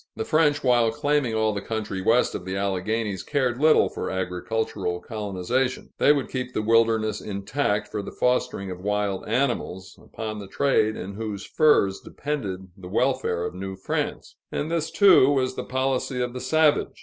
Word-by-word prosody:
The 220 Hz, -, -3 dB
French, 155 Hz, -6 st, +2 dB
while 120 Hz, -3 st, +4 dB
claiming 145 Hz, -2 st, 0 dB
all 110 Hz, -1 st, +1 dB
the 100 Hz, -, -3 dB
country 105 Hz, -3 st, -4 dB
west 115 Hz, +6 st, +3 dB
of -, -, -5 dB
the 95 Hz, +1 st, -4 dB
Alleghanies, 100 Hz, +1 st, -1 dB
cared 130 Hz, -4 st, -1 dB
little 155 Hz, 0 st, +5 dB
for -, -, -5 dB
agricultural 95 Hz, 0 st, -2 dB
colonization; 110 Hz, +5 st, -2 dB
they -, -, +6 dB
would 145 Hz, -2 st, +1 dB
keep 125 Hz, -1 st, -4 dB
the 110 Hz, -, 0 dB
wilderness 110 Hz, -1 st, +2 dB
intact, 105 Hz, +2 st, -1 dB
for 105 Hz, -, -4 dB
the -, -, -7 dB
fostering 110 Hz, -6 st, 0 dB
of 90 Hz, -, -7 dB
wild 105 Hz, 0 st, -1 dB
animals, 115 Hz, -7 st, -2 dB
upon 110 Hz, -1 st, -6 dB
the 100 Hz, -, -8 dB
trade 110 Hz, -2 st, +2 dB
in 100 Hz, -, -6 dB
whose 105 Hz, -1 st, -5 dB
furs 125 Hz, -11 st, +3 dB
depended 100 Hz, -11 st, -5 dB
the 95 Hz, -3 st, -11 dB
welfare 100 Hz, -6 st, 0 dB
of 90 Hz, -, -4 dB
New 95 Hz, +1 st, -6 dB
France 95 Hz, -, -4 dB
and 155 Hz, +3 st, -3 dB
this, 165 Hz, -2 st, -1 dB
too, 190 Hz, -9 st, +6 dB
was 130 Hz, -3 st, +1 dB
the -, -, -4 dB
policy 130 Hz, 0 st, -1 dB
of 125 Hz, -1 st, -2 dB
the 125 Hz, -, -5 dB
savage. 155 Hz, +3 st, +2 dB
110 Hz, 175 wpm, -25 LUFS, 100-130 Hz, -, they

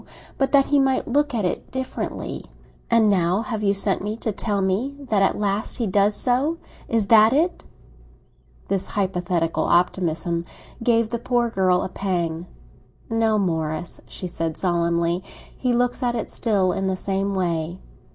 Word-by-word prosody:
But 270 Hz, -, +1 dB
that 275 Hz, -1 st, +5 dB
he 290 Hz, -, +3 dB
might 270 Hz, -1 st, +1 dB
look 290 Hz, +1 st, +1 dB
at 215 Hz, -4 st, 0 dB
it 180 Hz, -, -3 dB
differently." 260 Hz, 0 st, -4 dB, 0.4 s
"And 230 Hz, -2 st, +4 dB
now 180 Hz, -2 st, +2 dB
you 220 Hz, -, -1 dB, 0.2 s
have 200 Hz, 0 st, +3 dB
sent 195 Hz, -1 st, +3 dB
for -, -, -8 dB
me 210 Hz, +2 st, -3 dB
to 225 Hz, -, -2 dB
tell 205 Hz, 0 st, -2 dB
me 200 Hz, +9 st, 0 dB
that 205 Hz, -3 st, +2 dB
at 195 Hz, -, +2 dB
last 205 Hz, 0 st, -1 dB
he 240 Hz, -, -1 dB
does 200 Hz, +1 st, +2 dB
so. 270 Hz, +9 st, +1 dB, 0.3 s
Is 225 Hz, -3 st, +1 dB
that 220 Hz, +1 st, +7 dB
it?" 330 Hz, +6 st, +1 dB, 1.0 s
This 195 Hz, -1 st, -1 dB
hypothetical 180 Hz, -4 st, -1 dB
optimism 170 Hz, -1 st, +1 dB, 0.4 s
gave 230 Hz, -1 st, +2 dB
the 235 Hz, -, -2 dB
poor 240 Hz, -1 st, 0 dB
girl 185 Hz, -3 st, +2 dB
a -, -, -3 dB
pang. 175 Hz, -3 st, -2 dB, 0.6 s
"No, 225 Hz, -1 st, +2 dB
Morris," 160 Hz, -3 st, -2 dB
she -, -, -7 dB
said 165 Hz, -2 st, -3 dB
solemnly, 170 Hz, 0 st, 0 dB, 0.3 s
"he 250 Hz, -, -1 dB
looks 245 Hz, +2 st, +1 dB
at 240 Hz, -1 st, 0 dB
it 230 Hz, -, -4 dB
still 200 Hz, -5 st, +1 dB
in 195 Hz, +1 st, -1 dB
the 190 Hz, -, 0 dB
same 195 Hz, +1 st, -2 dB
way." 170 Hz, -2 st, -1 dB
200 Hz, 165 wpm, -23 LUFS, 180-230 Hz, 1.0 s, that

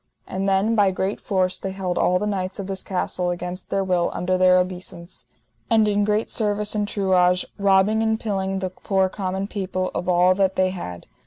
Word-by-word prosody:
And 195 Hz, +1 st, -2 dB
then 195 Hz, +4 st, +2 dB
by 205 Hz, -3 st, +4 dB
great 190 Hz, +2 st, -2 dB
force 185 Hz, -2 st, 0 dB
they 190 Hz, -, -4 dB
held 185 Hz, -2 st, -3 dB
all 180 Hz, -, +2 dB
the 205 Hz, -, -2 dB
knights 190 Hz, -2 st, -2 dB
of 200 Hz, -, -4 dB
this 190 Hz, 0 st, -3 dB
castle 180 Hz, -1 st, -2 dB
against 180 Hz, +1 st, -5 dB
their 195 Hz, -, 0 dB
will 180 Hz, -2 st, +1 dB
under 185 Hz, +1 st, 0 dB
their 185 Hz, 0 st, +5 dB
obeissance, 180 Hz, -1 st, -4 dB, 0.4 s
and 220 Hz, -2 st, +4 dB
in 205 Hz, 0 st, +2 dB
great 210 Hz, +1 st, 0 dB
service 210 Hz, -1 st, -1 dB
and 210 Hz, -1 st, -1 dB
truage, 180 Hz, -3 st, +2 dB
robbing 200 Hz, +2 st, +3 dB
and 220 Hz, 0 st, +1 dB
pilling 195 Hz, -3 st, -2 dB
the 190 Hz, -1 st, -3 dB
poor 190 Hz, 0 st, 0 dB
common 190 Hz, 0 st, -3 dB
people 185 Hz, -2 st, -3 dB
of 180 Hz, -, -3 dB
all 180 Hz, +1 st, +5 dB
that 190 Hz, 0 st, +1 dB
they 185 Hz, 0 st, +2 dB
had. 90 Hz, -, -7 dB
190 Hz, 195 wpm, -23 LUFS, 185-200 Hz, 0.4 s, their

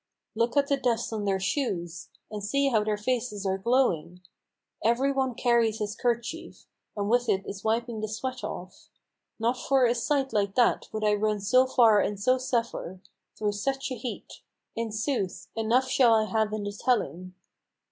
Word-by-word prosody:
Look 235 Hz, +4 st, 0 dB
at 280 Hz, -, +5 dB
the 280 Hz, 0 st, +1 dB
dust 235 Hz, -3 st, -1 dB
on 210 Hz, -2 st, -3 dB
their 195 Hz, -1 st, +1 dB
shoes! 180 Hz, -, -2 dB, 0.2 s
and 210 Hz, -1 st, -5 dB
see 275 Hz, +7 st, +1 dB
how 220 Hz, -5 st, +2 dB
their 210 Hz, 0 st, -1 dB
faces 215 Hz, -2 st, -2 dB
are 190 Hz, 0 st, 0 dB
glowing! 185 Hz, -7 st, +1 dB, 0.6 s
Every 245 Hz, +5 st, +2 dB
one 265 Hz, -3 st, -1 dB
carries 235 Hz, -3 st, +2 dB
his 210 Hz, 0 st, -3 dB
kerchief, 245 Hz, +9 st, -3 dB, 0.3 s
and 200 Hz, 0 st, -1 dB
with 245 Hz, +2 st, +2 dB
it 195 Hz, 0 st, +1 dB
is 195 Hz, -1 st, -7 dB
wiping 230 Hz, 0 st, -1 dB
the 215 Hz, -, -2 dB
sweat 255 Hz, +4 st, -5 dB
off. 180 Hz, +1 st, -7 dB, 0.5 s
Not 235 Hz, +3 st, +1 dB
for 265 Hz, +1 st, +2 dB
a 235 Hz, -, +3 dB
sight 270 Hz, +3 st, 0 dB
like 200 Hz, -2 st, 0 dB
that 245 Hz, -2 st, +2 dB
would 215 Hz, 0 st, -4 dB
I 210 Hz, 0 st, +3 dB
run 210 Hz, 0 st, 0 dB
so 255 Hz, +6 st, +4 dB
far 230 Hz, -5 st, +5 dB
and 205 Hz, -1 st, -1 dB
so 255 Hz, +5 st, +2 dB
suffer, 235 Hz, -7 st, -2 dB, 0.4 s
Through 210 Hz, -1 st, 0 dB
such 270 Hz, +6 st, -2 dB
a -, -, -2 dB
heat; 240 Hz, +1 st, -7 dB, 0.3 s
in 230 Hz, -1 st, -3 dB
sooth, 215 Hz, -3 st, -2 dB
enough 230 Hz, +4 st, +2 dB
shall 250 Hz, -3 st, +5 dB
I 220 Hz, -1 st, +3 dB
have 215 Hz, +1 st, 0 dB
in 215 Hz, -1 st, -3 dB
the 205 Hz, -, -3 dB
telling." 185 Hz, -, -1 dB
225 Hz, 180 wpm, -27 LUFS, 205-255 Hz, 0.6 s, at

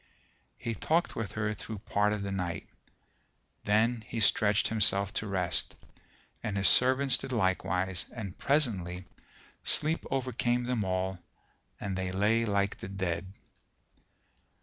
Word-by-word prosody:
He 115 Hz, -, -3 dB
talked 160 Hz, -, 0 dB
with 110 Hz, -3 st, -4 dB
her 110 Hz, 0 st, -1 dB
through 110 Hz, +1 st, -7 dB
part 105 Hz, +1 st, +1 dB
of 105 Hz, -1 st, -2 dB
the 100 Hz, -, -3 dB
night, 90 Hz, -4 st, -3 dB, 1.0 s
then 110 Hz, +2 st, +2 dB
he 115 Hz, -, -4 dB
stretched 105 Hz, -1 st, +3 dB
himself 100 Hz, -3 st, +3 dB
to 110 Hz, -, -2 dB
rest: 90 Hz, -6 st, 0 dB, 0.7 s
and 105 Hz, -3 st, -2 dB
his 100 Hz, -, +3 dB
servants 130 Hz, +1 st, +4 dB
did -, -, -6 dB
likewise 95 Hz, -4 st, 0 dB
and 100 Hz, -6 st, -6 dB
presently 95 Hz, -, 0 dB, 0.6 s
sleep 155 Hz, +2 st, +2 dB
overcame 125 Hz, -2 st, 0 dB
them 120 Hz, -3 st, 0 dB
all 95 Hz, 0 st, -1 dB, 0.6 s
and 100 Hz, -2 st, -3 dB
they 95 Hz, -1 st, -2 dB
lay 105 Hz, +5 st, +2 dB
like 100 Hz, -1 st, 0 dB
the -, -, -7 dB
dead. 95 Hz, -1 st, -3 dB
105 Hz, 130 wpm, -30 LUFS, 95-115 Hz, 1.0 s, servants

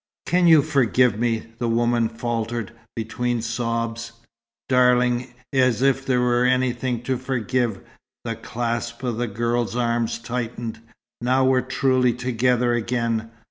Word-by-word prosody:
"Can 180 Hz, 0 st, +3 dB
you 160 Hz, -4 st, +7 dB
forgive 125 Hz, -5 st, +2 dB
me?" 115 Hz, -1 st, -1 dB
the 120 Hz, -1 st, 0 dB
woman 120 Hz, 0 st, +2 dB
faltered, 115 Hz, -1 st, -3 dB, 0.2 s
between 120 Hz, +2 st, -2 dB
sobs. 115 Hz, 0 st, -3 dB, 0.5 s
"Darling, 125 Hz, -1 st, +3 dB, 0.2 s
as 130 Hz, -3 st, +2 dB
if 135 Hz, 0 st, +2 dB
there 125 Hz, -2 st, +2 dB
were 120 Hz, 0 st, +2 dB
anything 125 Hz, -1 st, 0 dB
to 130 Hz, 0 st, -1 dB
forgive!" 120 Hz, -4 st, -1 dB, 0.4 s
The 115 Hz, -1 st, -3 dB
clasp 115 Hz, +1 st, -4 dB
of 120 Hz, -3 st, -2 dB
the 120 Hz, 0 st, -1 dB
girl's 120 Hz, +2 st, -1 dB
arms 115 Hz, -1 st, 0 dB
tightened. 115 Hz, -1 st, -4 dB, 0.4 s
"Now 130 Hz, +2 st, +2 dB
we're 130 Hz, -1 st, +3 dB
truly 130 Hz, -1 st, +2 dB
together 125 Hz, 0 st, +1 dB
again. 115 Hz, -1 st, -1 dB
120 Hz, 130 wpm, -23 LUFS, 115-125 Hz, 0.5 s, you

